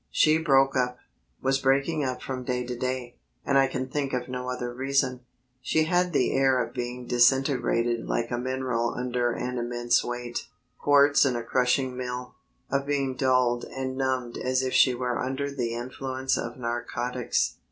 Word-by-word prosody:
She 155 +1 +4
broke 135 -4 +3
up, 125 -1 0 0.5
was 135 +1 +2
breaking 140 +4 +2
up 130 -1 -3
from 130 -1 -4
day 125 0 -2
to 125 0 -4
day, 125 0 -4 0.3
and 140 - +1
I 135 0 +5
can 130 0 -3
think 140 0 -2
of 125 -1 -2
no 125 0 -4
other 125 -1 -3
reason. 130 0 0 0.4
She 155 - +2
had 180 +2 +1
the 145 - +2
air 135 -1 +3
of 120 -1 -2
being 125 0 -4
disintegrated, 120 -2 +2
like 115 +1 -1
a 120 - -1
mineral 125 -2 -1
under 125 -1 0
an 125 +1 -3
immense 120 0 +1
weight 120 0 -4 0.3
quartz 145 0 +5
in 130 -3 +2
a 120 - -3
crushing 130 +2 +1
mill; 125 0 -5 0.4
of 140 +1 0
being 140 -2 0
dulled 125 -2 +2
and 130 0 -4
numbed 130 -3 -1
as 130 +1 0
if 130 - -2
she 130 -2 +5
were 125 -1 -2
under 135 +2 -2
the 120 -4 -2
influence 130 +2 -2
of 120 0 -4
narcotics. 120 0 -2
130 Hz, 175 wpm, -27 LUFS, 120-135 Hz, 0.5 s, I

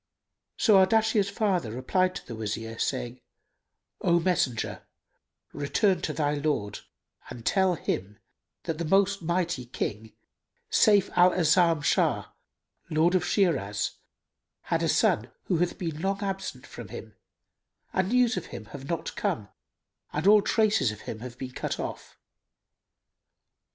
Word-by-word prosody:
So 215 -4 +5
Ardashir's 220 0 +2
father 195 - 0
replied 185 +10 0
to - - -7
the 120 - -7
Wazir, 115 +1 -5
saying, 125 -1 -2 0.8
"O 170 0 +3
messenger, 165 -10 -1 0.7
return 180 +6 +1
to - - -2
thy 145 -2 0
lord 145 -9 -1 0.5
and 115 -1 -9
tell 190 -2 +3
him 100 - -3 0.5
that 165 -2 -3
the 170 - -2
most 195 +3 +2
mighty 170 -4 -1
King 110 -2 -4 0.6
Sayf 205 -3 +4
al 180 0 +7
A'azam 165 -2 +3
Shah, - - +1 0.6
Lord 160 +3 +3
of 185 -2 +2
Shiraz, 135 - +1 0.7
had - - -1
a - - +1
son - - +2
who 180 - 0
hath 175 +1 0
been 160 -3 -4
long 195 +2 -1
absent 195 -1 -4
from - - -9
him - - -9 0.8
and 190 0 +1
news 250 0 +3
of - - -4
him 110 - -8
have 140 -1 -8
not 170 - -3
come 105 -2 -2 0.6
and 150 +4 -3
all 210 +1 +7
traces 210 - +2
of 105 - -10
him 110 - -7
have 120 +1 -9
been 130 0 -6
cut - - -4
off. - - -6
170 Hz, 140 wpm, -27 LUFS, 125-190 Hz, 0.8 s, al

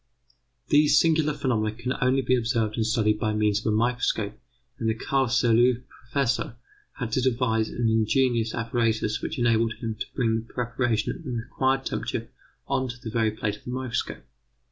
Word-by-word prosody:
These 150 0 +5
singular 160 -2 +3
phenomena 115 -7 0
can 120 +3 -2
only 130 +1 +3
be 130 +1 +3
observed 115 -3 0
and 115 - 0
studied 110 -2 +1
by 110 0 0
means 105 -1 +2
of 110 - +1
a - - +1
microscope, 115 -3 0 0.5
and 115 - 0
the 110 - +1
Carlsruhe 125 -1 +2
Professor 125 -1 -2 0.4
had 120 -4 -5
to 130 - +1
devise 115 -3 +1
an 120 -1 -1
ingenious 115 +1 +2
apparatus 115 -2 0
which 160 - -4
enabled 115 -2 +2
him 115 -1 -4
to - - -2
bring 115 -3 +1
the 115 - -12
preparation 120 -2 0
at - - -11
the - - -6
required 130 +3 -1
temperature - - -3 0.4
on 130 - 0
to 120 - -5
the 115 -2 -6
very 115 -1 +2
plate 105 -1 -3
of - - -23
the - - -8
microscope. 125 -1 -3
115 Hz, 175 wpm, -26 LUFS, 110-130 Hz, 0.5 s, These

